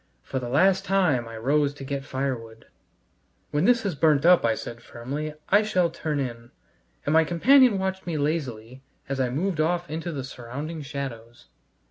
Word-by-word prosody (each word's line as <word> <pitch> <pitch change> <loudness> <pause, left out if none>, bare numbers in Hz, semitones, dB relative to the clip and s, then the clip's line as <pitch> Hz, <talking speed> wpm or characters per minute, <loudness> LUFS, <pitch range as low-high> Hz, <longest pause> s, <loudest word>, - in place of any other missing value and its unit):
For 130 - -3
the 120 -1 -5
last 185 +8 +3
time 170 -11 +1
I 115 0 -8
rose 145 +4 +1
to 140 - -9
get 135 0 -4
firewood. 125 -5 -4 0.9
"When 145 +4 +1
this 240 -1 +4
has 200 -4 -1
burnt 150 0 +3
up," 180 0 +6
I 115 -1 +2
said 115 +2 -8
firmly, 140 +7 -6
"I 205 +2 +6
shall 185 -6 +1
turn 155 -3 -3
in," 120 -3 -5 0.6
and 145 - +1
my 160 0 +6
companion 235 - +5
watched 190 -1 -3
me 165 -3 -1
lazily 135 -5 -3 0.3
as 135 -1 -3
I 130 -1 +1
moved 165 +6 -2
off 175 +1 -1
into 165 +2 -4
the 140 -4 -4
surrounding 140 +5 -6
shadows. 130 -5 -7
145 Hz, 175 wpm, -25 LUFS, 130-170 Hz, 0.9 s, up